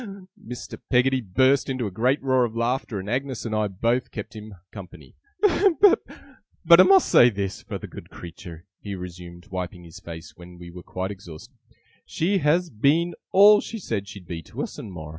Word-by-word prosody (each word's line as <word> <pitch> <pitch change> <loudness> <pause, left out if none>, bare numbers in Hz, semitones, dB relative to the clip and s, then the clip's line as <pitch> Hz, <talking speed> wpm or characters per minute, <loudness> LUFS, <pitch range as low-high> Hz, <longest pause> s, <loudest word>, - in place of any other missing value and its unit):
Mr. 125 +1 -8
Peggotty 130 +1 +3
burst 130 +8 +2
into 130 -3 -2
a 100 - -4
great 125 +9 +1
roar 130 -2 +3
of 115 -2 -3
laughter, 115 -2 -2
and 95 - -8
Agnes 130 +2 -3
and 110 - -3
I 110 -1 +1
both 115 +6 -1
kept 110 0 -8
him 105 -1 -10 0.2
company. 90 -9 -12 0.3
'But 395 -1 +2
I - - +12
must 385 -2 +5
say 120 - +6
this, 100 -3 -4
for - - -6
the - - -9
good - - -11
creetur,' 85 0 -11
he 100 -1 -6
resumed, 90 -1 -10
wiping 90 -1 -5
his 85 -2 -12
face, 80 0 -10
when 90 0 -13
we 85 0 -11
were 90 +1 -10
quite 95 +2 -5
exhausted; 90 -6 -12 0.5
'she 190 +4 0
has 165 +3 +1
been 155 +10 +1 0.2
all 205 +2 +7
she 230 - -7
said 110 - -4
she'd 100 -3 -11
be 85 -2 -5
to - - -6
us, - - -7
and 100 - -8
more. 80 -4 -8
110 Hz, 190 wpm, -24 LUFS, 90-135 Hz, 0.5 s, I